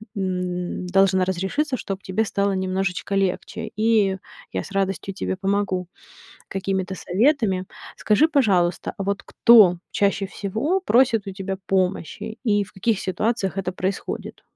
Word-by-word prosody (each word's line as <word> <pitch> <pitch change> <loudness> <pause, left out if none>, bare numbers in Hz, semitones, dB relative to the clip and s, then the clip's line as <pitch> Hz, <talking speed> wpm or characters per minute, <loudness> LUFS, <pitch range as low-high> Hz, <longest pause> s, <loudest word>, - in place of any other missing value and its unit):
м, 180 -1 -3
должна 190 0 +3
разрешиться, 190 - -1
чтоб 195 -5 -5
тебе 190 +4 0
стало 200 -2 0
немножечко 190 +1 -2
легче. 190 -2 -1
И 215 -3 +2 0.4
я - - -2
с - - -11
радостью 195 0 -1
тебе 190 - -3
помогу 190 -2 -1 0.6
какими-то 190 -1 -2
советами. 200 - +1 0.3
Скажи, 225 +9 +3
пожалуйста, 195 - +1
а 195 - -3
вот 200 +1 -1
кто 210 -7 +6
чаще 200 0 +1
всего 220 - -1
просит 235 - +3
у - - -3
тебя 195 0 -4
помощи 190 +2 -1
и 205 -3 +2
в 200 - -16
каких 210 +1 0
ситуациях 200 0 -1
это 185 -1 -1
происходит? 190 +2 -4
195 Hz, 135 wpm, -23 LUFS, 185-210 Hz, 0.6 s, кто